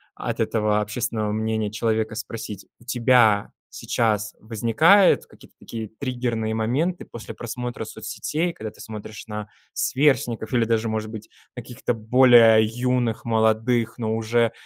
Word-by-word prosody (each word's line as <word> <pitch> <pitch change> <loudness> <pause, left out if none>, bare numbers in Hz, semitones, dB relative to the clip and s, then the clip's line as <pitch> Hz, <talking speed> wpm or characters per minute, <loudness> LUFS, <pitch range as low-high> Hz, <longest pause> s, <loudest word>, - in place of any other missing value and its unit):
от - - -4
этого 105 -1 +1
общественного 110 0 -2
мнения 110 0 -1
человека, 110 0 -1
спросить: 110 -3 -7
у - - -19
тебя 120 -4 +3 0.2
сейчас 105 -3 -1
возникают 120 - +4
какие-то - - -19
такие 110 -2 -6
триггерные 120 -4 -2
моменты 140 +12 -1
после 115 - -9
просмотра 120 +1 -5
соцсетей, 170 +3 -3
когда 110 -6 -7
ты - - -15
смотришь 110 0 -9
на 105 -1 -5 0.3
сверстников 130 -5 +1
или 120 -2 +3
даже, 115 0 0
может 110 0 -3
быть, 110 -1 -9 0.3
каких-то 120 0 -4
более 115 -1 +6
юных, 120 0 -1
молодых, 115 +1 +1
но 110 -1 -1
уже, 115 +1 +1
115 Hz, 130 wpm, -23 LUFS, 110-120 Hz, 0.3 s, более